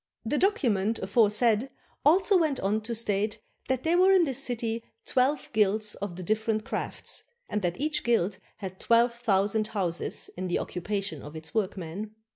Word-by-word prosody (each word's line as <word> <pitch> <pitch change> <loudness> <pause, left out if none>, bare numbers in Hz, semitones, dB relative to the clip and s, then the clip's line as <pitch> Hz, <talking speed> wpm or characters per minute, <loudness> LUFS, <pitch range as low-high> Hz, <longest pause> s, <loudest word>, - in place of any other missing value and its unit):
The 285 +6 0
document 225 - +2
aforesaid 220 +4 +3 0.3
also 375 +7 +5
went 315 -6 +2
on 205 +3 0
to 230 +2 -4
state 210 -1 0 0.3
that 260 -1 0
there 335 +2 +3
were 380 +1 +6
in 375 -2 +6
this 275 -3 +1
city 230 -2 -2 0.2
twelve 265 0 +1
guilds 210 0 +2
of 200 -3 -5
the 185 - -6
different 215 +3 0
crafts, 265 - -4 0.2
and 210 - -2
that 175 +3 -2
each 300 +2 0
guild 210 -5 +1 0.2
had 190 -2 -7
twelve 235 +1 +4
thousand 215 -2 +1
houses 185 -6 -2
in 185 +1 -3
the 175 - 0
occupation 195 -4 -3
of 150 +2 -10
its 160 +4 -8
workmen. 205 0 -3
215 Hz, 165 wpm, -28 LUFS, 195-245 Hz, 0.3 s, were